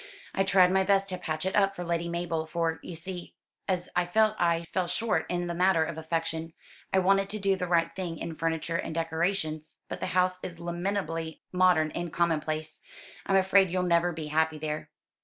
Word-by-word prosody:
"I 195 - +2
tried 190 -1 +5
my 190 0 +3
best 195 0 +2
to 185 - -2
patch 155 -1 -3
it 190 - -1
up 195 -1 +3
for 180 - -4
Lady 170 0 -1
Mabel; 170 -2 -2
for, 165 -1 -1
you 175 - -7
see, 175 +2 -7 0.3
as 180 -2 0
I 175 0 +2
felt 215 +3 +3
I 170 -1 +2
fell 185 -2 +1
short 215 -5 0
in 175 0 -1
the 175 - -3
matter 180 -1 +3
of 160 0 -4
affection, 165 0 -2 0.4
I - - +3
wanted 195 +1 +3
to 215 - -3
do 195 -1 +2
the 180 -1 -3
right 170 -1 +2
thing 175 -3 -4
in 165 - -5
furniture 165 +1 -1
and 160 - -4
decorations. 160 -1 -1
But - - -5
the - - -2
house 185 0 +2
is 170 -2 -7
lamentably 170 -2 -3
modern 180 -4 +4
and 170 -1 -4
commonplace. 155 -2 -1 0.5
I'm 195 - +3
afraid 190 0 +5
you'll 180 +1 0
never 175 0 +3
be 160 -2 -5
happy 160 +1 +1
there." 155 0 -4
170 Hz, 200 wpm, -28 LUFS, 160-185 Hz, 0.5 s, tried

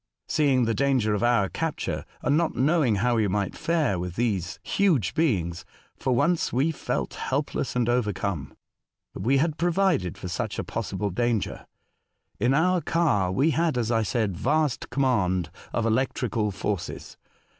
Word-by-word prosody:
Seeing 135 -5 +2
the 115 - +1
clanger 130 -5 +2
of 105 - -1
our 120 -4 +3
capture, 165 - -3 0.2
and 145 - +2
not 165 +1 +1
knowing 140 -4 +3
liow 120 +4 +1
we 110 -2 +2
might 100 0 -1
fare 155 - 0
with 90 0 -4
these 100 -7 -1
huge 170 - +1
beings, 90 - 0 0.3
for 130 - 0
once 170 +7 +2
we 135 +6 +2
felt 155 - -3
helpless 140 -1 -2
and 120 -2 +1
overcome. 105 - -1 0.6
But - - -7
we 130 +7 +3
had 155 +2 0
provided 175 - +1
for - - -6
such 90 - -3
a - - -2
possible 100 +1 -3
danger. 115 +1 -1 0.7
In 125 +5 +3
our 180 +3 +3
car 110 - +1
we 140 +12 +2
had, 160 -4 +1
as 120 -1 0
I 115 -1 +2
said, 110 -3 -1
vast 145 - 0
command 105 - +1 0.2
of 115 - -1
electrical 115 -2 0
forces. 100 -1 -4
120 Hz, 155 wpm, -26 LUFS, 100-150 Hz, 0.7 s, our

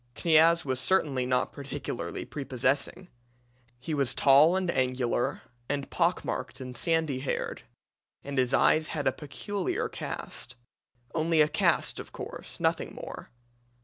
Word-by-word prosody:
"Kniaz 165 0 +4
was 130 -2 -1
certainly 135 -6 +2
not 125 0 +1
particularly 140 -1 -5
prepossessing. 135 +4 -1 0.7
He 155 +5 -4
was 140 -3 +1
tall 145 +5 +6
and 185 -2 0
angular, 125 -3 0 0.3
and 140 -1 -2
pock - - +1
marked 130 - -4
and 125 -1 -7
sandy 160 -1 +1
haired; 135 - -3 0.6
and 140 -1 -2
his 125 -1 +2
eyes 155 +3 +4
had 145 -3 -3
a 130 - +4
peculiar 180 +8 -3
cast - - -6 0.6
only 165 0 +1
a 150 - +6
cast, 150 - +1
of - - -9
course, - - -8
nothing - - 0
more. - - -8
140 Hz, 135 wpm, -29 LUFS, 130-160 Hz, 0.7 s, tall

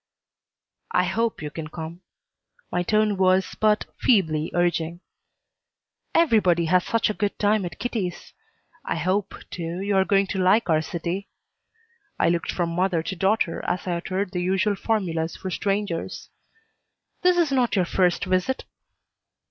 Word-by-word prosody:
"I - - +4
hope 230 -6 -1
you 150 - -4
can 155 0 -6
come." 165 +2 -8 0.7
My 180 - +1
tone 215 +2 +2
was 185 0 +2
but 215 0 +3
feebly 160 -9 +2
urging. 175 -1 0 1.1
"Everybody 210 - +4
has 180 +2 +3
such 230 -2 +1
a - - -4
good 205 -1 -2
time 210 -1 +2
at 170 -2 -7
Kitty's. 200 -5 -4 0.5
I - - -2
hope, 185 +5 -1 0.2
too, 170 0 -4
you 200 +1 0
are 190 - +5
going 195 0 +3
to 190 - -2
like 185 +1 +3
our 155 -1 +3
city." 170 +4 -4 0.9
I - - +3
looked 170 0 0
from 175 -2 -1
mother 180 -1 +1
to 190 - -4
daughter 190 -1 +1
as 180 - -1
I 175 -2 -1
uttered 185 +2 -3
the 180 -2 -2
usual 190 +3 +1
formulas 175 -7 -1
for 190 - -5
strangers. 195 -2 -2 0.9
"This 360 0 +4
is 335 -4 +2
not 250 -4 +2
your 185 -3 +2
first 180 0 +1
visit?" 185 +8 0
185 Hz, 150 wpm, -24 LUFS, 170-205 Hz, 1.1 s, are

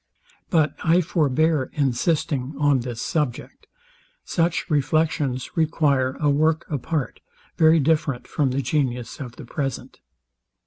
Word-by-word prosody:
But 155 -3 +2
I 165 +2 +4
forbear 155 -3 +1
insisting 140 0 0
on 145 -2 +3
this 120 -2 -5
subject. 150 -4 -3 0.6
Such 170 0 0
reflections 150 -3 0
require 145 -5 +1
a 150 - +1
work 155 +3 +2
apart, 145 0 -2 0.4
very 160 0 +5
different 150 -3 0
from 145 -3 0
the 135 +2 -1
genius 125 -4 -2
of 125 -4 -7
the 145 - -10
present. 135 +1 -5
145 Hz, 120 wpm, -23 LUFS, 130-160 Hz, 0.6 s, very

